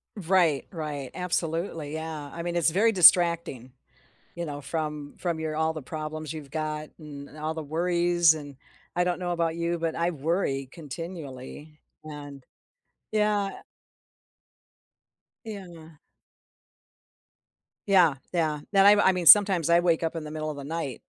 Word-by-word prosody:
Right, 175 -6 +2
right, 150 -6 -5
absolutely, 165 -3 -2
yeah, 160 -2 -5
I 170 - -6
mean, 175 0 -3
it's 170 -1 +3
very 205 +7 +3
distracting, 170 - +4 0.6
you 170 0 -5
know, 145 -2 -6
from 150 0 -4
from 170 -3 -2
your 155 -1 -3
all 160 0 +1
the 155 - -6
problems 155 +2 -6
you've 155 -3 -8
got, 155 0 -4
and 145 -1 -10
all 155 +1 -3
the 160 - -5
worries, 175 +1 +2
and 145 -3 -9 0.4
I 175 - +2
don't 180 0 -1
know 180 -1 -2
about 165 -1 -1
you, 170 0 -1
but 165 -1 -2
I 170 +1 0
worry 145 -3 -1
continually, 150 -2 -9 0.3
and 145 -3 -9 0.7
yeah 210 -2 0 1.8
Yeah. 175 -7 -10 1.9
Yeah, 180 -7 +5 0.2
yeah, 155 -4 0
that 195 -1 +5
I 205 - +9
m 210 - +2
I 190 - +5
mean, 180 -2 -3
sometimes 190 -3 +7
I 170 +1 +5
wake 170 -2 +1
up 165 +1 -2
in 165 - -4
the 150 - -8
middle 155 0 -4
of 150 - -5
the 140 - -7
night. 145 -4 -4
160 Hz, 150 wpm, -26 LUFS, 150-175 Hz, 1.9 s, I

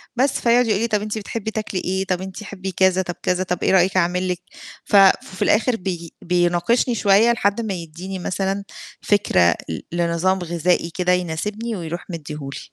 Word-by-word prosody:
بس، 265 +2 +1
فيقعُد 240 +1 +4
يقول 210 -3 +2
لي: 235 - +1
"طَب 210 -2 0
أنتِ 215 +1 -3
بتحبّي 220 +1 -4
تاكلي 215 -3 -3
إيه، 190 +1 -1
طَب 185 -1 -1
أنت 190 +2 -7
تحبّي،" 195 -2 -6
كذا، 190 +1 +3
طب 175 -1 -5
كذا، 180 0 +1
طَب 180 -1 -3
إيه - - +3
رأيك 190 0 +3
أعمل 180 +1 +1
لِك. 180 -1 -2 0.5
ف - - 0
ففي 190 -1 +4
الآخِر 230 +3 +3
بي 175 -4 -5
بيناقشني 175 +8 +1
شوية 210 +2 +4
لحد 205 -1 +1
ما 215 -3 -3
يدّيني 180 +2 -7
مثلًا 195 +2 -2 0.4
فكرة 90 - +3
ل 80 - -3
لنظام 170 +2 +1
غذائي 175 0 0
كده 180 -1 +1
يناسبني 200 +7 -2
ويروح 170 -2 -5
مدّيه 160 -3 -6 0.2
لي. - - -6
185 Hz, 185 wpm, -21 LUFS, 175-210 Hz, 0.5 s, فيقعُد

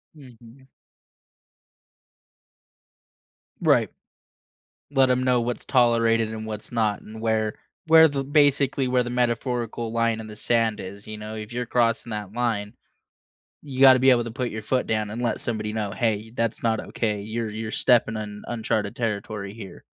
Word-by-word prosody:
Mhm. 130 -2 -16 2.9
Right. - - +3 1.0
Let 135 -2 +3
'em 125 0 +2
know 125 -1 +3
what's 120 +1 -3
tolerated 115 -3 +3
and 110 0 -6
what's 105 +1 -7
not 110 -3 0
and 110 +1 -11
where 110 -1 0 0.3
where 160 0 +8
the 140 -2 -2
basically 140 -2 +3
where 125 0 +2
the 120 - -5
metaphorical 120 -1 -1
line 115 -1 0
in 110 - -8
the 105 -1 -10
sand 115 -1 +1
is. 100 +2 -8
You 110 - -6
know? 105 +1 -7
If 105 +1 -7
you're 125 0 -3
crossing 115 0 +1
that 105 -2 -5
line, 110 -3 -2 0.9
you 135 -3 -8
gotta 130 -1 +8
be 130 - +5
able 120 -1 +3
to 115 - -6
put 125 0 -3
your 110 0 -5
foot 125 +4 -1
down 110 -1 -1
and 115 +3 -5
let 115 -3 -1
somebody 110 -2 -3
know, 105 -2 -2
"Hey, 110 -1 -1
that's 115 -2 -2
not 110 -1 +1
okay. 105 -3 -2
You're 110 +2 -4
you're 110 +1 -5
stepping 115 -3 +3
on 105 -1 -7
uncharted 110 -3 -2
territory 105 -3 -3
here." 105 -4 -11
115 Hz, 160 wpm, -24 LUFS, 110-125 Hz, 2.9 s, where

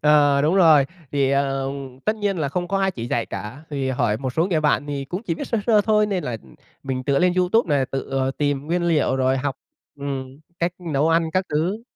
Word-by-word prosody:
Ờ, 145 -2 +4
đúng 155 +5 +2
rồi, 160 -7 +6 0.3
thì, 140 -2 +2
ờm, 135 -1 -2
tất 215 - +1
nhiên 205 -3 -1
là 150 -3 0
không 175 +5 -3
có 195 +1 0
ai 195 0 +2
chỉ 120 -10 -6
dạy 120 -1 -1
cả 120 +9 -7
vì 135 -2 -1
hỏi 120 -4 +1
một 130 -1 -3
số 165 +6 +1
người 170 -5 +1
bạn 150 -1 +1
thì 140 -1 -3
cũng 180 +9 -5
chỉ 175 -8 -2
biết - - -5
sơ 230 - 0
sơ 220 -3 +5
thôi 210 0 +3
nên 195 -4 -2
là 120 - -3 0.5
mình 130 -1 -3
tựa 140 0 +2
lên 180 +2 +3
YouTube 180 -3 +2
nè, 135 - +2
tự, 135 - -4
ờ, 135 0 0
tìm 145 0 -1
nguyên 175 +2 0
liệu, 155 -6 +2
rồi 130 0 +2
học, 135 0 -2 0.4
ừm, 135 -1 -5 0.2
cách 170 0 0
nấu 160 -4 0
ăn 165 0 +2
các 185 +2 +1
thứ. 175 +9 -1
145 Hz, 235 wpm, -22 LUFS, 135-175 Hz, 0.5 s, rồi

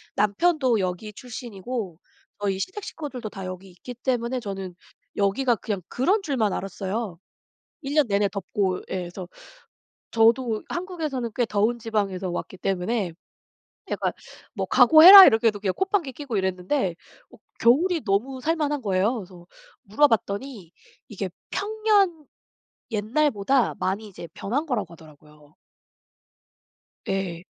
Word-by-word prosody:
남편도 245 - +2
여기 185 +3 -3
출신이고 230 -5 -6 0.4
저희 195 -2 -1
시댁 380 - -5
식구들도 275 - -6
다 195 -2 -8
여기 185 +1 -8
있기 180 +8 -10
때문에 245 0 -1
저는 195 -5 -6 0.4
여기가 230 +5 +2
그냥 200 -1 -4
그런 370 - +1
줄만 255 - 0
알았어요. 195 -1 -4 0.6
1 280 -1 -5
년 300 -4 +4
내내 200 -1 +1
덥고 195 -1 -2
예 - - -2
그래서 180 +1 -7 0.8
저도 230 0 +2
한국에서는 315 -9 -4
꽤 245 - +2
더운 215 +3 0
지방에서 200 -5 -2
왔기 175 - -5
때문에 195 +1 -1 0.8
약간 - - -1 0.4
뭐 - - -2
"각오해라." 365 +5 +10
이렇게 225 +1 +4
해도 210 -2 0
그냥 195 -2 -1
콧방귀 380 -7 0
끼고 270 -3 -6
이랬는데 190 +2 -1 0.4
어 - - -16 0.2
겨울이 320 +8 +3
너무 240 +7 -1
살 325 +5 +1
만한 295 -2 -1
거예요. 200 +2 +1
그래서 180 -5 -10 0.4
물어봤더니 215 - 0 0.4
이게 195 -3 -5 0.2
평년 410 -6 +1 0.7
옛날보다 235 +2 +1
많이 200 +4 -2
이제 180 -4 -10
변한 270 +10 -2
거라고 210 - -2
하더라고요. 150 -2 -18 1.5
예. 190 -3 -3
220 Hz, 290 characters per minute, -24 LUFS, 195-270 Hz, 1.5 s, 각오해라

